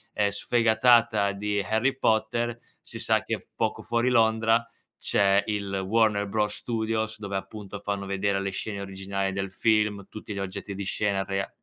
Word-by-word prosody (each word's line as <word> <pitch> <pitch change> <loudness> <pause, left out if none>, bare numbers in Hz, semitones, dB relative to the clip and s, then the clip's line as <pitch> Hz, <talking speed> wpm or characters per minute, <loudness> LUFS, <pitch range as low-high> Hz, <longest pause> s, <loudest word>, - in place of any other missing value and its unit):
ehm, 105 -1 +3
sfegatata 115 -1 +3
di 100 +1 -1
Harry 110 +7 +1
Potter, 115 0 +1 0.2
si - - -9
sa - - +2
che - - -2 0.2
poco - - -1
fuori 120 +1 +1
Londra 115 -1 +3 0.3
c'è 100 0 +3
il 100 -2 -2
Warner 105 -1 +2
Bros 105 0 0
Studios, 110 -1 -2
dove, 100 -2 -3
appunto, 105 0 -7
fanno 100 -1 -3
vedere 100 0 0
le 100 - -1
scene 100 +1 -4
originali 95 0 -3
del 95 0 -3
film, 105 0 +1
tutti 110 -1 -7
gli 100 - -4
oggetti 95 +1 -5
di 100 - -4
scena 100 0 0
rea 95 0 -2
105 Hz, 160 wpm, -27 LUFS, 100-110 Hz, 0.3 s, ehm